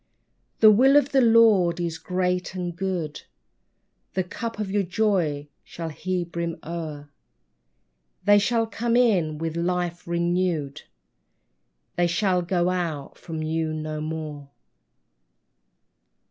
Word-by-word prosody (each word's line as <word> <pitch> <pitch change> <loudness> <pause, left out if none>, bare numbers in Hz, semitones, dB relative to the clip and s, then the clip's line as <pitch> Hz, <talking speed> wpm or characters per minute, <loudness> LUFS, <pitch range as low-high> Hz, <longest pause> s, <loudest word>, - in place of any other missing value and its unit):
The 215 -1 +9
Will 260 +6 +5
of 290 0 +2
the 270 - +4
Lord 225 -7 +5
is 170 -2 -3
great 180 +1 -1
and 175 -2 -4
good, 175 -5 -3 0.9
The 190 - +1
cup 230 +5 -6
of 210 -3 -3
your 205 0 +2
joy 180 -7 0 0.2
shall 165 -1 -6
He 180 +3 -2
brim 170 -1 -4
o'er; 155 -3 -6 1.1
They 205 +1 +6
shall 230 +2 +1
come 230 +1 -1
in 185 -11 +2
with 165 0 -3
life 175 0 -2
renewed. 170 -4 -1 1.2
They 175 0 +3
shall 180 +1 +1
go 175 0 0
out 165 -6 -4
from 160 -2 -5
you 160 0 -1
no 155 0 -4
more. 155 -2 -5
175 Hz, 120 wpm, -25 LUFS, 160-195 Hz, 1.2 s, The